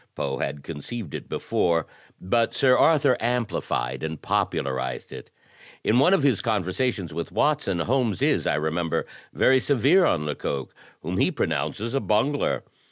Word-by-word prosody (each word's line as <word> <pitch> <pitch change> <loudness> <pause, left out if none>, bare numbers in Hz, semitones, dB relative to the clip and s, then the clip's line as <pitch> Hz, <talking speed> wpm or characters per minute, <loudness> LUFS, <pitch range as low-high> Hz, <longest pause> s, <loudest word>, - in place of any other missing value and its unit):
Poe - - -3
had 70 - -3
conceived 85 +4 -7
it - - -7
before, 85 -2 0 0.3
but 115 +5 0
Sir 130 -2 +4
Arthur 145 -3 +4
amplified 115 - -2
and 80 -1 -4
popularized 65 -1 -2
it. - - -10 0.5
In 115 +3 +3
one 140 - +5
of 185 - 0
his 135 -7 +2
conversations 100 - -1
with 85 +1 -4
Watson, 140 - +1
Holmes 120 -1 0
is, - - +2
I - - +2
remember, 80 +2 -1 0.3
very 130 0 +4
severe 140 - +3
on 75 - +1
Lecoq, 70 -2 -4 0.3
whom - - -3
he - - +3
pronounces 115 +4 -2
*a 135 - +2
bungler.' 135 +6 0
110 Hz, 150 wpm, -25 LUFS, 80-130 Hz, 0.5 s, one